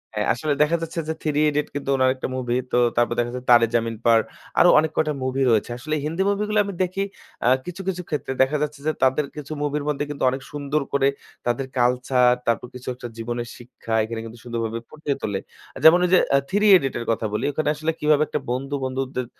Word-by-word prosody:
হ্যাঁ, 105 0 0
আসলে 145 +4 -1
দেখা 165 +3 +1
যাচ্ছে 165 +1 -4
যে, - - +1
'3 150 -2 0
Idiots' 150 0 -2
কিন্তু 140 -1 -4
উনার 130 0 +4
একটা 130 - -4
movie 125 -1 -1
তো - - +2 0.2
তারপর 120 0 +3
দেখা 120 0 +1
যাচ্ছে 125 - -6
যে - - -29
'Taare 120 -1 +7
Zameen 115 -1 0
Par' 115 -1 +5 0.4
আরো - - +7
অনেক 155 0 0
কয়টা 155 -1 +2
movie 130 +1 0
রয়েছে। 110 +1 +1
আসলে 155 +4 -3
হিন্দি 165 +5 -2
movie 200 +1 0
গুলো 210 0 +2
আমি 200 - -5
দেখি 185 +2 -2 0.4
আ - - +4 0.2
কিছু, 180 +2 -6
কিছু 180 -1 -1
ক্ষেত্রে 145 -3 -2
দেখা 135 +3 +3
যাচ্ছে 150 -1 -4
যে, - - +4
তাদের 130 +3 +3
কিছু 150 0 -7
movie 145 0 -1
এর 145 - -7
মধ্যে 145 -1 -1
কিন্তু 145 -2 -4
অনেক 130 +1 -4
সুন্দর 145 +1 -1
করে 140 -1 +3 0.4
তাদের 120 +3 0
culture, 125 0 +3 0.2
তারপর 115 +1 0
কিছু 125 - -10
একটা 120 - -7
জীবনের 120 +1 -4
শিক্ষা, 120 -1 -8
এখানে 115 +1 -4
কিন্তু 115 +1 -10
সুন্দরভাবে 115 -1 -3
ফুটিয়ে 150 -2 -3
তোলে। 100 -2 -2 0.4
যেমন 165 +3 +8
ঐ - - +2
যে 185 - +7 0.2
আ - - +7
'3 205 +2 +1
Idiot' 135 -7 -3
এর 120 - -5
কথা 115 - -1
বলি। 105 - -1
ঐখানে 150 +1 -1
আসলে 155 +2 -1
কিভাবে 150 0 +3
একটা - - -2
বন্ধু 135 +3 -2
বন্ধুদের 130 -1 -3
135 Hz, 225 wpm, -23 LUFS, 120-150 Hz, 0.4 s, যেমন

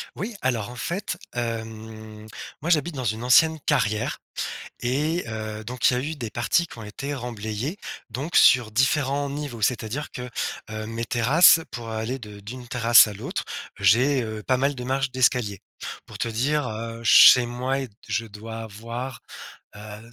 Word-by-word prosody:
Oui, 220 +4 -5
alors, 120 -4 -1
en 120 - -9
fait, 180 - -3 0.2
hem, 110 -2 -6 0.3
moi, 160 - -3
j'habite 160 -1 +2
dans 130 - -4
une 110 0 -2
ancienne 160 +6 +5
carrière 115 -7 0 0.6
et 150 +8 0
heu, 110 -1 -5
donc 120 +2 +1
il - - +1
y - - +1
a - - +1
eu 155 +2 -3
des 120 -6 -5
parties 160 +10 +1
qui - - -12
ont 115 - -8
été 135 +7 -5
remblayées, 120 - -4 0.3
donc 140 +10 -5
sur 120 -5 +6
différents 140 +4 +1
niveaux, 140 -5 -5
c'est-à-dire 120 +6 -1
que, 125 -1 -7 0.4
hem, 110 +1 -5
mes 115 +1 -3
terrasses, 135 +9 +6
pour 120 -2 -6
aller 110 +4 -3
de 105 -3 -10
d'une 120 +4 -9
terrasse 115 -2 +6
à 105 - -6
l'autre, 100 - -4 0.4
j'ai, 125 +8 +4
heu, 110 -1 -6
pas 130 -1 +1
mal 140 +2 +1
de 125 - -6
marches 135 +1 -1
d'escalier. 125 -6 +1 0.4
Pour - - -11
te - - -1
dire, 130 +5 0
heu, 115 +1 -6
chez 120 +2 +8
moi, 125 +3 -2
est 130 -4 -6 0.2
je 115 - -1
dois 110 +2 -8
avoir, 115 +4 -7 0.5
heu, 105 +2 -10
120 Hz, 175 wpm, -24 LUFS, 110-135 Hz, 0.6 s, chez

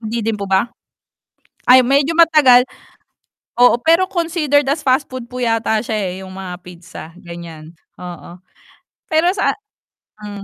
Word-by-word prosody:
Hindi 225 0 -4
din 225 -1 -1
po 200 - -5
ba? 195 +5 +1 1.0
Ay, 255 +1 +8
medyo 280 +5 +1
matagal. 305 -7 +5 1.0
Oo, 245 -1 +5
pero 335 +5 +2
considered 320 -6 0
as 295 +3 0
fast 260 +1 +1
food 255 -2 -8
po 250 - -7
yata 225 -2 0
siya, 220 - -3
eh, 190 -4 -3
yung 185 - -11
mga 190 -2 -7
pizza 175 -1 -12
ganiyan, 170 -3 -11 0.2
oo. 175 -1 -10 0.8
Pero 320 +3 +3
sa 395 - 0 0.7
hmm. 205 -1 -8
240 Hz, 145 wpm, -17 LUFS, 195-290 Hz, 1.0 s, Ay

